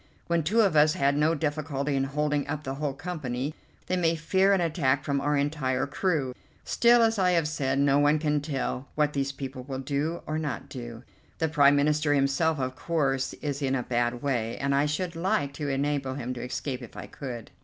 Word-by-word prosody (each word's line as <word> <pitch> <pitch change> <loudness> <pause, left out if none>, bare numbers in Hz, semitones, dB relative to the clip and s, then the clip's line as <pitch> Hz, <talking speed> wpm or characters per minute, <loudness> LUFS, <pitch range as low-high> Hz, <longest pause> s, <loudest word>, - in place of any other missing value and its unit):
When 170 -1 +1
two 210 +9 +3
of 195 -7 +2
us 150 +1 +5
had 140 -5 +2
no 155 +3 +3
difficulty 145 -2 -2
in 135 0 +1
holding 150 +1 -1
up 150 - -3
the 135 - -3
whole 140 -1 -3
company, 145 -5 -4 0.3
they 185 - -1
may 165 -2 +2
fear 190 +5 +2
an 195 - +4
attack 150 -6 +1
from 140 -1 0
our 145 +1 +1
entire 140 -3 0
crew. 145 -4 -1 0.3
Still, 235 0 +4
as 225 -2 +2
I 180 -1 +3
have 165 -3 +2
said, 135 -3 -1
no 140 0 +4
one 145 +1 +4
can 150 -1 0
tell 135 -2 -3
what 150 -1 +1
these 140 -1 -1
people 135 -1 -6
will 130 +1 -5
do 145 +5 -2
or 155 +1 -2
not 140 -3 -4
do. 120 -3 -8 0.3
The 160 - 0
Prime 145 -2 +5
Minister 150 +1 +2
himself, 140 +4 +2
of 130 -1 -2
course, 135 -5 0
is 145 -1 -2
in 135 -1 +1
a 125 - -1
bad 120 0 -1
way, 120 -5 -1
and 140 0 0
I 140 +2 +3
should 170 +3 -2
like 175 -4 0
to 145 0 -4
enable 135 -1 -1
him 125 -2 -4
to 120 - -6
escape 130 +1 -4
if 120 - -11
I - - -6
could." 120 -5 -7
145 Hz, 210 wpm, -27 LUFS, 135-155 Hz, 0.3 s, us